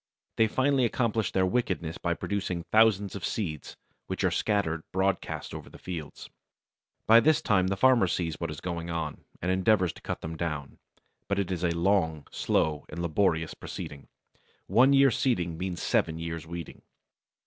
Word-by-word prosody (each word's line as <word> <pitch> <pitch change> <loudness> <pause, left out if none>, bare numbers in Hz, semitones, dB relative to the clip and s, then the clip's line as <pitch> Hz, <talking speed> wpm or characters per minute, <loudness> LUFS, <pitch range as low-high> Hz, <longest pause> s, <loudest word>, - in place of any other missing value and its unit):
They 110 - +5
finally 130 +3 +2
accomplish 115 -3 0
their 95 -1 +2
wickedness 90 -6 -1
by 85 -1 0
producing 95 -4 -3
thousands 105 -1 +3
of 100 - -6
seeds, 80 -9 -4 0.3
which - - -3
are - - +3
scattered 100 -7 0
broadcast 95 0 -1
over - - -8
the - - -13
fields. 80 -5 -7 0.8
By 115 +1 +8
this 155 +5 +4
time 95 -5 +2
the 95 +1 -1
farmer 125 -4 +5
sees 85 -2 -2
what 85 - -3
is 75 -1 -7
going 85 -1 -4
on, 85 -1 -4 0.2
and 90 - +1
endeavours 95 -1 +2
to - - -15
cut - - -4
them 80 +1 -5
down; 75 -4 -4 0.5
but 100 - 0
it 95 -2 -1
is 90 -1 -2
a 90 - +3
long, 85 -5 +1
slow, 75 -1 0
and - - -7
laborious 80 -1 +1
proceeding. 70 -1 -8 0.6
One 125 +8 +5
year's 135 -2 +5
seeding 90 -10 +1
means 90 0 -4
seven 80 -1 +1
years' 80 -1 -5
weeding. 85 -1 -7
90 Hz, 170 wpm, -28 LUFS, 80-105 Hz, 0.8 s, By